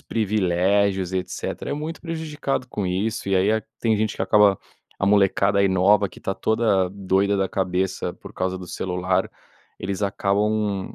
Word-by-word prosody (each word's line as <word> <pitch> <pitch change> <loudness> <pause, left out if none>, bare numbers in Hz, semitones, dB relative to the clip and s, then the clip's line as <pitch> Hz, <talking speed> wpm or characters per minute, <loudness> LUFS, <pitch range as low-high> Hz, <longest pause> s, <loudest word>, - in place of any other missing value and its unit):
privilégios, 95 -2 +1
e 95 - +1
etcétera, 90 - -5
é - - -1
muito 155 +3 -5
prejudicado 155 -6 -3
com 105 -5 -3
isso, 100 +4 -2
e 95 - +2
aí 95 +3 +3
a 110 0 +2 0.2
tem 110 -2 +2
gente 110 0 -1
que - - -3
acaba 105 -2 +5 0.4
a - - +2
molecada, 100 0 +3
aí, 100 - +4
nova, 100 +2 +3
que - - -15
está 95 - -2
toda 105 -4 +1
doida 100 +1 +1
da 95 -1 0
cabeça 95 0 -1
por - - -13
causa 95 0 -2
do 90 -2 -9
celular, 90 +1 -1 0.5
eles 95 +1 -3
acabam, 100 0 0
100 Hz, 170 wpm, -23 LUFS, 95-105 Hz, 0.5 s, acaba